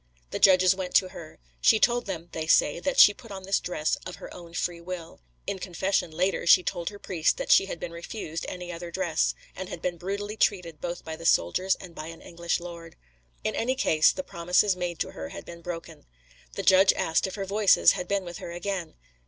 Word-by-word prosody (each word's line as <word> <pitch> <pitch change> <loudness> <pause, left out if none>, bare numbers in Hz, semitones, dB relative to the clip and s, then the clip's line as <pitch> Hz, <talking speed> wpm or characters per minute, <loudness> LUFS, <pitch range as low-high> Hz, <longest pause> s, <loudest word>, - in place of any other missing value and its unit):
The - - -3
judges 185 -1 +6
went 185 -1 -5
to 185 - +5
her. 160 -3 -11 0.2
She 220 - +5
told 240 0 +2
them 175 -3 -5
(they 160 0 -4
say) 155 0 +4
that 275 +8 -2
she 205 - +9
put 230 - -15
on 195 -2 -7
this 195 +1 +1
dress 155 -3 -1
of 180 - -7
her - - -10
own 170 -2 -11
free 170 -1 -2
will. 170 - -8 0.2
In 195 - -3
confession, 185 0 -1
later, 180 +3 -1
she 180 +1 +7
told 175 -2 -3
her 205 - -11
priest 170 -5 0
that - - -2
she 195 - +6
had 170 - -6
been 165 - -5
refused 170 -1 -6
any 180 -1 -6
other 170 0 -7
dress, 170 -2 0 0.2
and 185 -1 -6
had - - -6
been 175 +1 -3
brutally 200 +4 -4
treated 175 -7 0
both 175 0 -5
by 160 -1 -5
the 165 +1 -11
soldiers 185 - +2
and 180 -3 -12
by 155 -1 -7
an 165 0 -10
English 170 0 -2
lord. 170 -1 -9 0.5
In - - -1
any 255 +3 0
case, 155 -11 +4
the 280 - -5
promises 180 0 +2
made 175 -2 -3
to - - -2
her 80 0 -7
had - - -9
been 170 0 -10
broken. 165 -2 -8 0.5
The - - -4
judge 190 0 +6
asked 160 - +1
her - - -3
if - - -8
her 195 -2 -4
Voices 200 +1 +5
had 180 - -4
been 200 0 0
with 175 -1 -7
her - - -7
again. 175 0 -4
180 Hz, 225 wpm, -27 LUFS, 170-195 Hz, 0.5 s, she